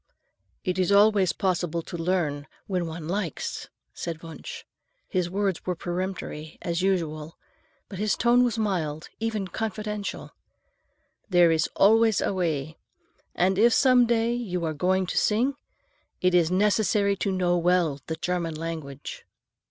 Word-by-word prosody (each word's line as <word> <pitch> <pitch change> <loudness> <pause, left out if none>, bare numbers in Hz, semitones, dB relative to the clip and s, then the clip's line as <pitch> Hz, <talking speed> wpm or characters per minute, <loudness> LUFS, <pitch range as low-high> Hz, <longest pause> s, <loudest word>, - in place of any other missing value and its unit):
"It 185 -1 -1
is 185 +1 +2
always 200 -2 +5
possible 175 -4 -1
to - - -8
learn 165 -5 -1 0.2
when 180 -3 -1
one 160 -1 -6
likes," 180 -3 -3 0.2
said 170 -1 -5
Wunsch. 465 - -8 0.4
His 180 -2 -1
words 195 -1 -1
were 180 - -2
peremptory, 175 -3 -5
as 170 0 -1
usual, 165 -5 -1 0.5
but 190 - -8
his 210 -1 +1
tone 240 +1 +4
was 240 -2 0
mild, 170 -8 -2
even 220 -3 -2
confidential. 210 0 -4 1.0
"There 175 -3 +5
is 160 -1 +1
always 220 +1 +5
a - - 0
way. 160 -4 -2 0.6
And 185 +2 +2
if 235 +2 +6
some 255 -3 +5
day 230 0 +2
you 185 -8 -2
are 160 - -1
going 185 +5 +1
to - - 0
sing, 240 +6 +2 0.7
it 185 0 +2
is 170 -2 +4
necessary 200 +1 +2
to 195 - -1
know 180 -2 +1
well 170 -5 +2
the 160 - -2
German 175 -2 -2
language." 155 -4 -6
185 Hz, 145 wpm, -26 LUFS, 165-210 Hz, 1.0 s, if